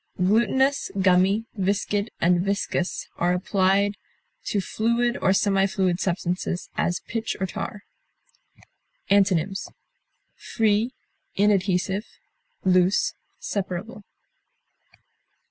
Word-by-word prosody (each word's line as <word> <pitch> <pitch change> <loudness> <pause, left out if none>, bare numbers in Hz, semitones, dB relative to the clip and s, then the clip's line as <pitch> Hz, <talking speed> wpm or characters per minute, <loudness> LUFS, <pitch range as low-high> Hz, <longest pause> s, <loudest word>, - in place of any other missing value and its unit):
Glutinous, 235 +8 +2
gummy, 190 +3 +3
viscid, 200 +2 0
and 175 0 +3
viscous 195 -2 -2
are 175 +1 +2
applied 195 +2 +1 0.5
to 205 - 0
fluid 235 +4 0
or - - +3
semi 195 0 +3
fluid 185 -2 0
substances, 180 -1 -2
as 175 - 0
pitch 225 -1 -4
or 190 - 0
tar. 200 +2 -6 1.3
Antonyms: 195 -2 +2 0.7
free, 220 +2 0 0.4
inadhesive, 195 0 +1 0.6
loose, 185 +1 +3 0.2
separable. 200 +2 -4
195 Hz, 85 wpm, -24 LUFS, 185-210 Hz, 1.3 s, gummy